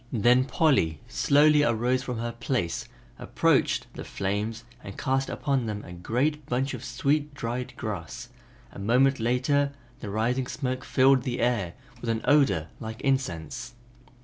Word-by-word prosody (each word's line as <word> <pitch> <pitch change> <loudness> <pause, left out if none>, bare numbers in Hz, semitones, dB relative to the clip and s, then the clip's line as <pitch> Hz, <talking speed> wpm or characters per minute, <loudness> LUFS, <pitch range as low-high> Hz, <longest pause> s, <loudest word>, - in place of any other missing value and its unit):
Then 125 +3 +4
Polly 130 - +2
slowly 150 +1 +4
arose 125 0 +1
from 125 -2 -4
her 120 +1 -3
place, 115 -7 -2 0.3
approached - - +1
the - - -7
flames 105 +4 -3 0.2
and 100 - -9
cast 135 0 0
upon 135 -5 -1
them 105 -1 -4
a 90 - -9
great 130 - -1
bunch 130 +3 -1
of 125 -1 -6
sweet 145 +1 0
dried 125 0 -4
grass; 100 -9 -5 0.4
a - - -10
moment 125 +6 +3
later 135 +5 +1 0.3
the 105 - -6
rising 120 +5 0
smoke 130 -2 -3
filled 135 -1 +4
the 125 -1 -3
air 115 -8 0 0.3
with 120 - -4
an 115 0 0
odor 135 - +3
like 110 +1 -7
incense. 125 - -2
125 Hz, 150 wpm, -27 LUFS, 110-135 Hz, 0.4 s, Then